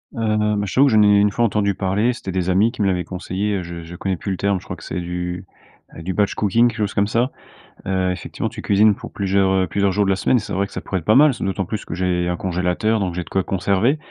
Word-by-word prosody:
Heu, 105 -1 +1
bah, 100 0 -1
je 95 - -5
t'avoue 140 +2 +5
que 130 - +2
j'en 105 - +6
ai, 105 0 +5
une 105 0 +3
fois, 120 - 0
entendu 100 -2 0
parler. 105 +7 +1
C'étaient 95 -5 -6
des 95 0 -1
amis 105 +5 +3
qui 120 - -6
me 100 - +2
l'avaient 90 -2 0
conseillé. 95 +3 -3
Je 85 0 -7
je 85 +2 -10
connais 95 +1 -2
plus 100 - -4
le 95 - -2
terme. 100 -2 0
Je - - -17
crois 90 - -6
que - - -13
c'est 90 - -4
du, 90 +1 -4 0.5
heu 80 - -8
du 95 +2 -3
batch 105 -1 +1
cooking, 115 +4 +3
quelque 115 - -8
chose 105 -2 -1
comme 100 0 +1
ça, 120 +4 0 0.6
heu, 95 -1 +1
effectivement, 90 - -4
tu - - -8
cuisines 105 0 +4
pour - - -10
plusieurs, 95 -1 +1
heu 95 -1 +2
plusieurs 100 +2 +1
jours 100 +1 +1
de - - 0
la 95 - +2
semaine 100 +6 +2
et - - +2
c'est 105 -1 -6
vrai 100 +1 0
que - - -17
ça - - -4
pourrait 95 - -3
être 80 - -14
pas 110 - +4
mal, 145 0 +6
ce 115 - -6
d'autant 95 -1 -1
plus 105 +3 -5
que - - -6
j'ai 90 -1 0
un 90 -1 -1
congélateur 90 +4 0
donc 90 -3 -2
j'ai 90 - -2
de - - -15
quoi 95 -1 0
conserver. 100 - +1
100 Hz, 300 wpm, -20 LUFS, 90-105 Hz, 0.6 s, j'en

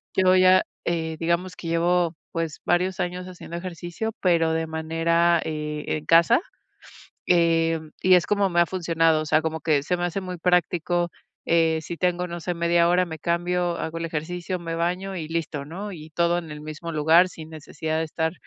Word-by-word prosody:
yo 185 -1 +4
ya, 185 0 +6 0.2
eh, 160 -2 -2
digamos 170 +2 -1
que 165 - -8
llevo, 170 0 +1 0.2
pues, 165 -2 -3
varios 180 +2 +1
años 180 0 -3
haciendo 175 -2 -9
ejercicio, 175 +4 -5
pero 165 -3 +3
de 160 0 -1
manera, 165 +2 +1
eh, 150 -1 -4
en 155 -1 -2
casa, 170 - +5 0.9
eh, 165 -2 +3 0.2
y 185 0 +5
es 180 - +4
como 200 -1 +2
me 175 0 +3
ha 170 - +4
funcionado. 165 -3 +1
O - - -7
sea, 155 +1 +3
como 160 0 -3
que 150 -3 +2
se 180 +5 0
me 175 - -2
hace 175 +2 -2
muy 180 -1 -6
práctico. 175 0 +1 0.4
Eh, 165 -1 +3
si 170 +2 -6
tengo, 180 0 0
no 170 0 -5
sé, 180 +2 -3
media 170 0 +3
hora, 180 +1 +3
me 160 -1 -7
cambio, 175 +1 0
hago 165 +1 -4
el 165 - -4
ejercicio, 175 +3 -4
me 165 -1 -5
baño 180 +3 -2
y 160 -3 -4
listo, 160 -3 -3
¿no? 195 +7 -6
Y 155 -2 -10
todo 170 +2 +1
en 165 -3 -7
el 150 0 -7
mismo 155 +2 -7
lugar, 160 +4 +5
sin 160 -3 -11
necesidad 155 0 -4
de 160 - 0
estar, 160 +1 -2
170 Hz, 195 wpm, -24 LUFS, 160-180 Hz, 0.9 s, ya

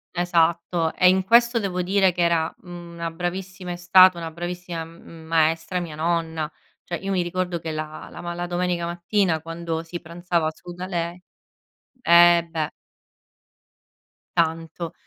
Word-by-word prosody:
esatto 170 -1 +1
e 180 - +6
in 190 0 +3
questo 235 +3 +4
devo 185 -4 -2
dire 190 +1 +3
che 175 - -3
era 170 -1 +2
mhmm 175 -2 -10
una 170 0 -3
bravissima 180 +2 -5
è - - -3
stata 180 +1 +6
una 165 -1 -5
bravissima 175 0 -5
m 165 0 -13
maestra 165 +2 +1
mia 165 -3 -6
nonna, 160 -1 -1 0.3
cioè 175 - -4
io 195 +2 -4
mi 185 - +1
ricordo 175 0 -2
che 160 0 -5
la 155 0 -6
la - - -9
ma 175 0 -4
la 175 0 -4
domenica 175 -1 -1
mattina 175 -1 0
quando 165 0 -4
si 170 +1 -6
pranzava 170 -1 -1
su 175 +2 -11
da 180 +1 -6
lei 170 -1 -3 0.8
eh 170 -2 +6
beh 155 -2 -2 1.7
tanto, 165 0 -1
175 Hz, 155 wpm, -23 LUFS, 165-180 Hz, 1.7 s, e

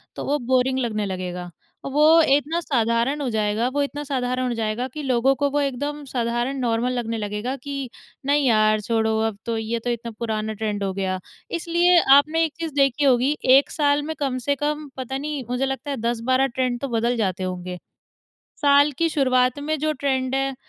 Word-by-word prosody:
तो - - -5
वो 290 +1 +1
बोरिंग 260 +1 +2
लगने 215 -4 -1
लगेगा। 180 -2 -5 0.4
वो 305 +4 +5
इतना 295 +4 +2
साधारण 240 0 0
हो 265 - -1
जाएगा 215 +2 0
वो 285 - +1
इतना 290 +1 -4
साधारण 255 -2 -1
हो 245 - -1
जाएगा 225 +3 -2
कि 300 +4 -7
लोगों 260 0 +2
को 285 +1 0
वो 290 - +1
एकदम 285 +2 -3
साधारण 240 +2 -1
नॉर्मल 240 0 0
लगने 230 -2 -2
लगेगा 210 +5 -3
कि 275 -3 -4 0.4
नहीं 285 +1 +2
यार 215 -2 +3
छोड़ो 220 0 0
अब 215 -2 -5
तो, 230 -1 -1
ये 225 +1 -2
तो 245 - -4
इतना 235 -1 -3
पुराना 220 -2 -2
ट्रेंड 210 -1 -3
हो 195 -1 -1
गया। 190 -1 -2 0.3
इसलिए 345 +1 +3 0.2
आपने 315 +3 +2
एक 310 - -5
चीज़ 325 -3 -4
देखी 275 0 +2
होगी 260 +2 +3 0.2
1 280 - +2
साल 290 -1 +2
में 315 +2 -4
कम 270 -3 -1
से 285 - +3
कम 300 +1 -2
पता 265 +1 -4
नहीं 290 -1 -4
मुझे 250 +2 0
लगता 270 +2 -4
है 275 - -3
10-12 240 +3 +1
ट्रेंड 250 -1 -2
तो 275 - -2
बदल 235 0 0
जाते 190 -3 -1
होंगे। 180 0 -4 0.9
साल 285 +1 +5
की 335 - +2
शुरुआत 255 -3 +2
में 310 +2 -2
जो 310 +1 0
ट्रेंड 265 -2 -1
है 270 0 -1
255 Hz, 195 wpm, -23 LUFS, 225-285 Hz, 0.9 s, वो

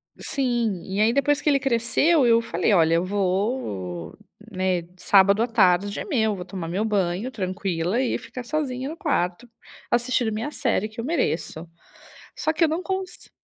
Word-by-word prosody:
Sim. 240 -8 -1
E, 195 +1 -3
aí, 220 +2 +4
depois 285 +2 +2
que 300 - +1
ele 280 -1 +3
cresceu, 270 +4 +2
eu 230 -1 +5
falei: 180 -1 0
"Olha, 165 -3 +4
eu 170 - +2
vou, 185 - -2 0.3
né, 185 -2 0
de 180 +2 -21
sábado 200 +3 +5
à - - 0
tarde 200 -3 +2
é - - -5
meu, 220 - +1
vou 180 -1 -7
tomar 180 -3 -6
meu 185 +5 -1
banho 200 +3 -1
tranquila 185 0 -2
e 260 - 0
ficar 250 - -8
sozinha 265 -1 -3
no 320 - -7
quarto, 235 - -1 0.4
assistindo 240 -1 +1
minha 225 +7 -3
série, 225 -8 0
que 220 +2 -13
eu - - -5
mereço". 170 - -2 0.7
Só 315 - 0
que 320 +1 +1
eu - - +5
não 330 +4 -2
cons 380 -1 -5
215 Hz, 180 wpm, -24 LUFS, 185-260 Hz, 0.7 s, eu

